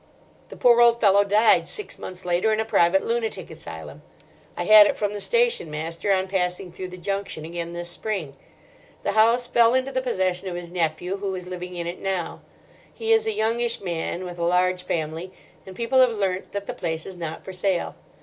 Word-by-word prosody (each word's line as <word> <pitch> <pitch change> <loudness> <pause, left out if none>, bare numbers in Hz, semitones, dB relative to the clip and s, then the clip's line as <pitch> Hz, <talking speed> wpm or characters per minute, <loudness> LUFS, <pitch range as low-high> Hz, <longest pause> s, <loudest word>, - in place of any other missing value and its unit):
The - - -10
poor 240 -1 +5
old 235 0 +5
fellow 200 -2 +5
died 210 +2 +4
six 420 -4 -3
months 185 -1 -7
later 180 +5 +1
in 215 - +1
a 220 - 0
private 190 -3 +3
lunatic 230 -1 -2
asylum; - - -9 0.6
I - - -1
had 215 -1 +8
it - - -1
from 205 -1 -1
the 205 - -5
station 475 - +1
master 165 +6 -3
on 190 -1 +2
passing 180 -1 -2
through 185 +2 -6
the 180 0 -10
junction 195 -3 -4
again 170 +1 -5
this 175 0 -5
spring. 175 -7 -4 0.7
The - - 0
house 230 +3 +4
fell 235 0 +4
into 260 +1 0
the 260 -1 -1
possession 190 -6 -1
of 175 - -5
his 175 -1 -7
nephew, 175 +2 -1
who 195 -1 -3
is 180 -1 -6
living 180 0 -7
in 170 -1 -4
it 175 +1 -5
now. 190 -3 -3 0.5
He 450 0 0
is 445 0 +2
a 440 - +1
youngish 230 - 0
man 175 0 -3
with 175 -1 -8
a - - -1
large 180 +1 +2
family, 165 +1 -4 0.3
and 190 - -9
people 235 +4 +1
have 255 - +6
learnt 195 -4 -2
that 200 0 -4
the - - -4
place 160 -2 -3
is 190 - -7
not 165 -2 -6
for 190 - -7
sale. 185 -1 -1
190 Hz, 205 wpm, -24 LUFS, 175-220 Hz, 0.7 s, had